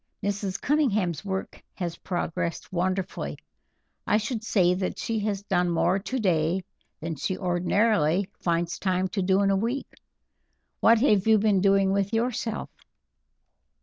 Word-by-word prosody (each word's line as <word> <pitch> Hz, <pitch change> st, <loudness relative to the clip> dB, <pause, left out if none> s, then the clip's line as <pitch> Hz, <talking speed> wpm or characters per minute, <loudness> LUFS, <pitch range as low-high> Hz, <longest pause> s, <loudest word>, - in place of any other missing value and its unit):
Mrs. 200 Hz, -1 st, -2 dB
Cunningham's 215 Hz, -, +1 dB
work 190 Hz, -1 st, -4 dB
has 175 Hz, -3 st, -3 dB
progressed 175 Hz, -1 st, -3 dB
wonderfully. 185 Hz, +1 st, -2 dB, 0.7 s
I 210 Hz, -, +4 dB
should 220 Hz, +1 st, -3 dB
say 185 Hz, -5 st, +3 dB
that 185 Hz, 0 st, -2 dB
she 225 Hz, -1 st, -2 dB
has 205 Hz, -1 st, -2 dB
done 180 Hz, -3 st, +1 dB
more 170 Hz, +3 st, +2 dB
today 190 Hz, -6 st, 0 dB, 0.4 s
than 165 Hz, +1 st, -3 dB
she 185 Hz, +7 st, -2 dB
ordinarily 180 Hz, 0 st, +2 dB
finds 170 Hz, 0 st, -1 dB
time 185 Hz, -1 st, 0 dB
to 195 Hz, +2 st, -2 dB
do 190 Hz, +1 st, +3 dB
in 195 Hz, -, +3 dB
a -, -, +3 dB
week. 235 Hz, +7 st, -2 dB, 0.9 s
What 230 Hz, +1 st, +6 dB
have 210 Hz, -6 st, +3 dB
you 220 Hz, -1 st, +6 dB
been 205 Hz, -2 st, +2 dB
doing 195 Hz, 0 st, +4 dB
with 200 Hz, +2 st, 0 dB
yourself?" 225 Hz, -1 st, -2 dB
195 Hz, 140 wpm, -26 LUFS, 180-210 Hz, 0.9 s, What